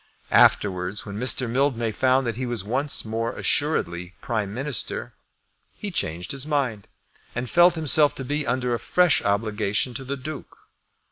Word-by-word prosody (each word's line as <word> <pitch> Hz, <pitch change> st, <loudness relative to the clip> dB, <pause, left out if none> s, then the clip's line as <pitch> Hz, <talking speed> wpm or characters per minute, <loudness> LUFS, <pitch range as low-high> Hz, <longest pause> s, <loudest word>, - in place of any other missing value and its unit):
Afterwards, 90 Hz, 0 st, +3 dB
when 100 Hz, 0 st, -6 dB
Mr. 125 Hz, +1 st, 0 dB
Mildmay 120 Hz, -2 st, 0 dB
found 130 Hz, +4 st, +2 dB
that 115 Hz, -2 st, -2 dB
he 130 Hz, +2 st, -3 dB
was 120 Hz, -5 st, -3 dB
once 130 Hz, +7 st, -1 dB
more 115 Hz, +1 st, -2 dB
assuredly 90 Hz, -, 0 dB
Prime 110 Hz, -4 st, -2 dB
Minister, 135 Hz, +2 st, -3 dB, 0.6 s
he 205 Hz, -, -5 dB
changed 85 Hz, -, -3 dB
his 140 Hz, +1 st, -3 dB
mind, 130 Hz, -9 st, -1 dB, 0.5 s
and 125 Hz, +1 st, -3 dB
felt 175 Hz, +6 st, +5 dB
himself 155 Hz, -2 st, +4 dB
to 135 Hz, -, -5 dB
be 145 Hz, +2 st, -2 dB
under 125 Hz, -1 st, 0 dB
a 120 Hz, -, -1 dB
fresh 180 Hz, -3 st, +3 dB
obligation 105 Hz, +3 st, 0 dB
to 135 Hz, -, -5 dB
the 140 Hz, +2 st, -4 dB
Duke. 150 Hz, +3 st, -8 dB
125 Hz, 155 wpm, -24 LUFS, 105-140 Hz, 0.6 s, felt